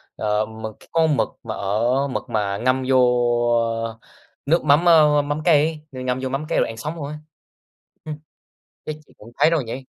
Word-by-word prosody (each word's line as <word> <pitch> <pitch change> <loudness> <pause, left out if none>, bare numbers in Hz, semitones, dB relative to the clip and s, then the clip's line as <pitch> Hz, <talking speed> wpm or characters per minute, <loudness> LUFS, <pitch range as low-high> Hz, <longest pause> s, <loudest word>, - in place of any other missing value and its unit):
ơ, 105 0 0
mực 110 0 -7
c - - -37
cái - - -20
con 160 -3 +2
mực - - +1
mà - - -5
ở 120 +8 0
mực 130 - -5
mà 100 -2 -1
ngâm 130 +3 +1
vô 130 - +4 1.5
nước 165 +5 +2
mắm, 150 +3 +4
ơ, 150 -3 +6
mắm 145 +1 -3
cay 155 -1 +3
ấy, 130 0 -6
ngâm 125 0 -1
vô 130 - -2
mắm 135 +4 -3
cay - - +1
rồi - - +2
ăn 115 - -8
sống 150 +8 -5
luôn 155 -4 -5
ấy. 150 +1 -6 0.9
Ừm. 150 -1 -6 0.7
Chắc 155 - -5
chị - - -23
cũng 115 +3 -14
thấy - - +5
rồi 160 -5 +1
nhỉ? 125 +3 -7
135 Hz, 205 wpm, -22 LUFS, 115-150 Hz, 1.5 s, ơ